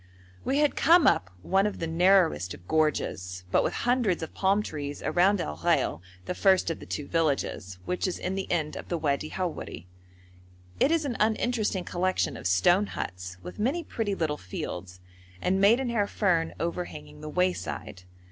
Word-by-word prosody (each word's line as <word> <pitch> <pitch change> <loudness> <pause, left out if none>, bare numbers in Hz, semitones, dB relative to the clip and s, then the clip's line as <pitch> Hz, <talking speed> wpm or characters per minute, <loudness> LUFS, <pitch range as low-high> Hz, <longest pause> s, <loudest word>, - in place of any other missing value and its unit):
We 270 - 0
had 295 -1 +3
come 335 -1 +5
up 95 - +3
one 195 - +3
of 210 - -4
the 165 - -3
narrowest 165 - +3
of 90 - -18
gorges, 95 -13 0
but - - +4
with - - -1
hundreds 240 -9 +2
of 160 - -7
palm 200 +2 +2
trees 145 -5 -5
around 190 +3 +3
Al 75 0 -3
Ghail, 80 - +1 0.2
the - - -2
first 190 -2 +3
of 165 - -5
the - - -11
two 145 - -4
villages, 140 - -1
which 180 - -1
is 185 - -2
in 185 - -3
the 195 0 -3
end 155 -3 0
of - - -8
the 175 - 0
Wadi 150 -1 -1
Howeri. 165 - -4 0.9
It - - +4
is 325 -2 +2
an 250 -5 -2
uninteresting 215 -3 +1
collection 185 +2 0
of - - -3
stone 175 - +4
huts, 90 - -6
with 90 - -9
many 275 +11 0
pretty 220 -8 -2
little 155 -4 -1
fields, 90 -2 -6 0.4
and 190 - +1
maidenhair 230 0 +3
fern 170 -7 +1
overhanging 170 -3 -5
the 155 - -6
wayside. 180 - -2
180 Hz, 175 wpm, -28 LUFS, 150-205 Hz, 0.9 s, come